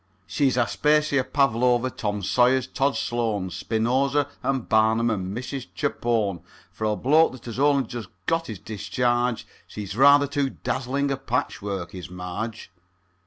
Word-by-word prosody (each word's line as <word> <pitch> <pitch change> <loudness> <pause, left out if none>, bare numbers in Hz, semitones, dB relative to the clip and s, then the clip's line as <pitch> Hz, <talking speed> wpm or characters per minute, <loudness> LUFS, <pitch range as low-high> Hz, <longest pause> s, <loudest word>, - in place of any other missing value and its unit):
She's 135 0 +1
Aspasia, 150 +3 +2
Pavlova, 125 -2 +2
Tom 105 -3 -3
Sayers, 125 +5 +3
Tod 140 +1 0
Sloan, 110 -6 -1
Spinoza, 130 - 0
and 135 -3 -1
Barnum, 110 +1 +3
and 95 0 -3
Mrs. 130 +1 -5
Chapone; 115 - -1 0.3
For 110 - -4
a 105 0 +1
bloke 150 +6 +3
that 130 - -12
has 120 +1 -6
only 140 -1 +4
just 115 -4 -7 0.2
got 165 0 0
his 110 - -6
discharge, 120 +4 -1 0.2
She's 100 -2 -7
rather 140 +3 +6
too 140 -1 -1
dazzling 135 +3 -2
a 135 - -1
patchwork, 100 -8 -3
is 90 -2 -8
Marge. 90 +4 -6
120 Hz, 140 wpm, -24 LUFS, 110-135 Hz, 0.3 s, rather